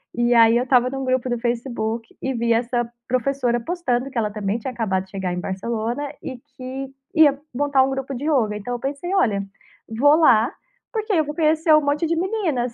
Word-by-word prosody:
E 240 +1 +2
aí, 230 0 +6
eu 245 - +1
estava 250 -1 +3
num 270 0 -4
grupo 255 0 0
do 240 - 0
Facebook 235 -1 -2
e 265 - -2
vi 235 -1 0
essa 235 0 0 0.2
professora 255 -1 0
postando 265 -3 -2
que 260 - -8
ela 215 -2 0
também 205 0 -2
tinha 245 +3 -5
acabado 210 -6 -1
de 190 - -25
chegar 190 -2 -3
em 180 - -3
Barcelona 225 +7 -3 0.2
e 260 -2 -6
que 265 0 -8 0.2
ia 295 -4 +5
montar 280 0 +3
grupo 270 0 -3
de 250 - -6
ioga. 235 -9 +1
Então 210 +4 -5
eu 245 - -3
pensei: 285 +8 -4
"Olha, 210 - +2 0.4
vou 275 +7 +4
lá, 255 -6 +4 0.4
porque 435 -2 -2
aí 345 - +3
eu 310 - +2
vou 295 +1 -6
conhecer 315 0 +2
um 305 - +5
monte 290 +3 +1
de 335 - 0
meninas". 330 - -1
255 Hz, 205 wpm, -22 LUFS, 230-285 Hz, 0.4 s, aí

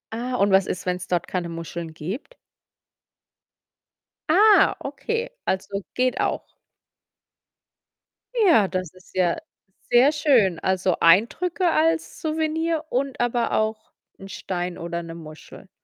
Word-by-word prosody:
Ah, 250 +2 -3
und 200 -4 +2
was 190 0 +4
ist, 180 - -4
wenn's 180 0 -3
dort 175 -2 -1
keine 180 -2 -3
Muscheln 165 0 -6
gibt? 205 - -7 1.9
Ah, 410 +6 +6
okay, 465 +2 -3 0.2
also, 195 +1 -2
geht 255 0 +1
auch. - - -3 1.8
Ja, 350 - +5
das 185 -3 -4
ist 185 0 -20
ja 180 -2 +2 0.5
sehr 250 +4 +6
schön. 250 - +3
Also, 185 -1 0
Eindrücke 320 - +3
als 325 +1 0
Souvenir 320 +1 -1
und 270 +1 -2
aber 240 0 0
auch 215 0 -1 0.3
'n 195 - -10
Stein 180 -2 -4
oder 170 0 -4
'ne 165 0 -8
Muschel. 155 -2 -12
205 Hz, 120 wpm, -23 LUFS, -, 1.9 s, Ah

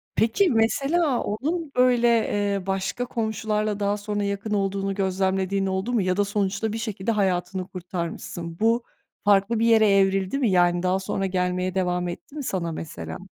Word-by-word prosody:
Peki, 325 - +3
mesela 275 +5 +2
onun 300 +8 -2
böyle, 250 -1 +4
eee, 205 -4 +1
başka 195 +6 -1
komşularla 215 -3 -1
daha 205 0 0
sonra 205 0 -3
yakın 200 +1 -2
olduğunu 195 -1 -1
gözlemlediğin 190 0 0
oldu 190 +6 -2
mu 225 - +3
ya 185 +1 0
da 205 - +3
sonuçta 205 +1 -1
bir - - -2
şekilde 220 -1 -2
hayatını 185 -2 -1
kurtarmışsın? 170 -1 -6
Bu 230 +2 +2 0.4
farklı 205 +2 +3
bir 230 - +2
yere 220 -2 +5
evrildi 195 +3 +2
mi? 250 -6 +2
Yani 175 0 +3
daha 185 +1 +2
sonra 195 0 -2
gelmeye 180 0 -1
devam 180 -1 0
etti 175 +11 -8
mi 290 - -4
sana 175 -7 -2
mesela? 160 0 -6
200 Hz, 160 wpm, -24 LUFS, 190-225 Hz, 0.4 s, yere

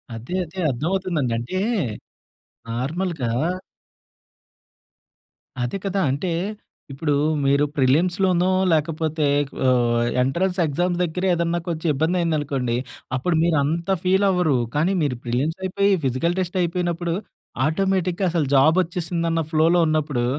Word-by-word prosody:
అదే. 120 +11 -6
అదే. 180 +4 -10
అర్థమవుతుందండి. 160 -1 -1
అంటే, 125 +11 -3 1.1
నార్మల్‌గా 140 +3 -2 2.3
అదే 125 +10 -2
కదా! 195 0 0
అంటే, 145 +7 -2 0.6
ఇప్పుడూ 145 +2 -1 0.3
మీరు 140 +2 +3
ప్రిలిమ్స్‌లోనో, 175 +6 +2 0.2
లేకపోతే 155 0 0 0.4
ఓ - - +5 0.5
ఎంట్రన్స్ 180 +8 0
ఎగ్జామ్స్ 175 +4 -1
దగ్గరే 180 +3 -1
ఏదన్నా 170 0 0
కొంచెం 165 0 -2
ఇబ్బందయిందనుకోండి, 150 -6 0 0.4
అప్పుడు 165 +6 0
మీరు 170 -3 +2
అంత 165 +5 -2
ఫీలవ్వరు, 185 -6 +3 0.2
కానీ 165 +6 +2
మీరు 125 -5 -1
ప్రిలిమ్సయిపోయి, 165 +11 0
ఫిజికల్ 140 +8 0
టెస్టయిపోయినప్పుడు, 175 -1 -1 0.5
ఆటోమేటిక్‌గా 185 +2 0
అసలు 160 -5 0
జాబొచ్చేసిందన్న 165 +2 +2
ఫ్లోలో 165 +2 +4
ఉన్నప్పుడు 150 -5 0
165 Hz, 95 wpm, -22 LUFS, 145-180 Hz, 2.3 s, ఓ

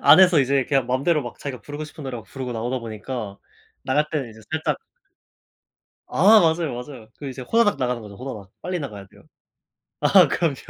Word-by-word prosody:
안에서 170 +2 +7
이제 135 0 +2
그냥 135 -3 +1
맘대로 140 +5 +1
막 120 - -8
자기가 130 -4 -6
부르고 145 +3 -6
싶은 150 0 -10
노래 130 -2 -4
막 115 - -9
부르고 130 -2 -6
나오다 120 +3 -2
보니까 110 -2 -6 0.4
나갈 150 +3 +1
때는 140 -6 -2
이제 110 0 -14
살짝 160 0 -1 1.3
아 215 +2 +6
맞아요 160 -4 +1
맞아요. 125 -2 -9
그 145 - -6
이제 130 0 -7
후다닥 210 - +2
나가는 125 -2 -1
거죠. 105 -2 -10
후다닥. 110 -6 -7
빨리 180 +1 -2
나가야 105 - -7
돼요. - - -20 0.8
아 - - +6
그럼요. 165 -5 0
135 Hz, 400 characters per minute, -23 LUFS, 120-155 Hz, 1.3 s, 안에서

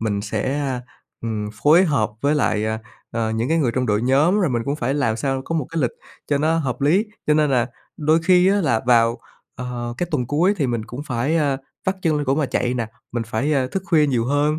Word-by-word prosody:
mình 105 -2 -1
sẽ, 115 +7 -2 0.6
ừm, 110 -2 -3
phối 165 +6 +6
hợp 115 - +1
với 145 +2 +2
lại, 110 -7 +1
à, 110 0 -1 0.3
ờ, 115 -1 -1
những 110 +3 -1
cái 165 +1 +2
người 130 -6 +2
trong 130 -1 0
đội 105 +2 +1
nhóm 150 +11 +3
rồi 175 - +1
mình 120 -2 0
cũng 140 +2 -1
phải 130 0 -1
làm 125 -7 +1
sao 135 +2 -1
có 165 - -3
một 150 -6 -1
cái 165 -3 -1
lịch 125 - +1 0.4
cho 145 -1 +1
nó 160 +2 +2
hợp 135 -3 -2
lý. 180 +10 +3 0.2
Cho 150 - +4
nên 150 -1 +3
là 125 -2 +2 0.3
đôi 155 +2 +3
khi 180 +1 +5
á, 200 +1 +3
là 115 -9 +1
vào, 115 0 +4 0.4
ờ, 120 -1 -5
cái 175 - 0
tuần 125 -6 0
cuối 175 +8 +2
thì 140 -6 0
mình 120 -3 -2
cũng 125 +4 -7
phải, 130 +6 0
ơ, 140 -4 +1 0.3
vắt 190 0 +1
chân 155 -2 +2
lên 145 - -1
cổ 135 +1 +2
mà 150 -2 0
chạy 125 0 -1
nè, 115 -3 -2 0.3
mình 120 -1 -1
phải, 130 +7 -1
ơ, 130 -3 +2
thức 190 +7 -3
khuya 155 -3 +4
nhiều 120 -4 +1
hơn, 145 +3 +1
135 Hz, 245 wpm, -21 LUFS, 120-155 Hz, 0.6 s, phối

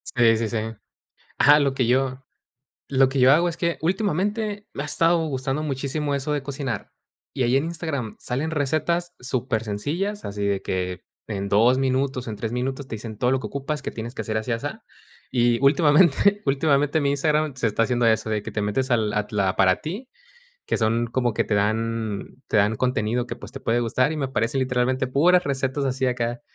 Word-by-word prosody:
Sí, 115 -2 +5
sí, 115 0 -1
sí. 115 - -2 0.8
Ajá, 145 +1 +7
lo 140 -2 +1
que 130 -3 0
yo 130 +1 +1 0.7
lo 135 -1 +4
que 135 +1 -3
yo 130 +2 +7
hago, 170 +4 +4
es 170 - -4
que, 170 -1 -1
últimamente, 205 +4 -1
me 140 - -3
ha - - -5
estado 165 +2 +2
gustando 135 0 -2
muchísimo 140 0 -2
eso 140 +2 -2
de 145 - -2
cocinar. 135 -5 -4 0.4
Y - - -1
ahí 125 +2 +3
en 140 - +2
Instagram 160 -8 -4
salen 135 +6 -2
recetas 165 +4 -1
super 125 -2 -2
sencillas, 165 - -3
así 100 0 -4
de 100 -1 0
que, 90 -1 -3 0.3
en 100 -2 -3
2 115 +6 +4
minutos, 130 -1 0
en 110 - -4
3 110 +2 -4
minutos, 130 +2 -3
te 110 - -4
dicen 110 0 -8
todo 125 +3 +1
lo 135 - +1
que - - -5
ocupas, 140 +2 -4
que - - -4
tienes 115 +2 -6
que - - -5
hacer 110 -1 -3
así, 110 +2 -2
asá. 115 - -4 0.5
Y, 120 -2 +2
últimamente 160 +7 +4
últimamente 145 +2 +2
mi 140 -1 +1
Instagram, 150 +1 +1
se 120 -2 0
está 110 +2 +1
haciendo 120 0 0
eso, 110 -1 +2
de 105 -1 -1
que - - -6
te 110 - -2
metes, 115 +6 -1
al 110 -3 +1
at 105 +2 -1
la 100 -3 0
para 95 -1 +4
ti. 200 +12 -6 0.6
Que - - 0
son, 115 +1 +1
como 120 0 0
que - - 0
te 105 - -1
dan 110 +2 -2
te - - 0
dan 105 +1 +3
contenido 120 0 0
que, 120 - -5
pues, - - -11
te - - -8
puede 115 +1 +1
gustar, 125 +3 +1
y 155 - -3
me 145 - -1
aparecen 125 0 -1
literalmente, 130 0 0
puras 175 +8 +4
recetas 135 0 -1
así 130 0 0
acá. 120 -1 -1
130 Hz, 205 wpm, -24 LUFS, 115-145 Hz, 0.8 s, Ajá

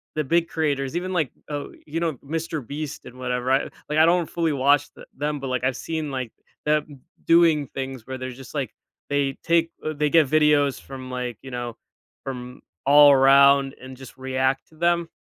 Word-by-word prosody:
the 155 - 0
big 170 +4 +2
creators, 145 -3 -1
even, 185 +2 -2
like, 160 -7 0 0.2
oh, 145 -1 -4
you 160 +2 -3
know, 165 -2 0
Mr. 160 -2 -4
Beast 150 +2 -6
and 125 - -12
whatever. 125 0 -1
I, 135 +1 +3 0.3
like, 150 - -1
I 160 - +7
don't 170 -1 +2
fully 165 -3 0
watch 140 +2 +3
the - - -13
them, 150 0 -2
but, 135 - -4
like, 130 -1 -2
I've 130 - +1
seen, 160 -2 -3
like, 130 -4 -4 0.3
them 150 -2 -1 0.2
doing 165 -4 +4
things 130 -4 -6
where 130 0 -5
they're 130 0 -5
just, 130 +2 -12
like, 135 -7 -3 0.4
they 140 -1 +1
take 170 0 +2 0.2
they 150 0 +1
get 165 -1 +5
videos 150 -2 +3
from, 130 -1 -9
like, 125 -3 -4
you 135 - -10
know, 120 -1 -5 0.5
from 125 -2 -7 0.2
all 145 +1 +8
around 140 0 +5
and 130 0 -10
just 130 0 -12
react 130 0 -1
to 160 - -21
them. 170 +1 +1
140 Hz, 195 wpm, -24 LUFS, 130-155 Hz, 0.5 s, all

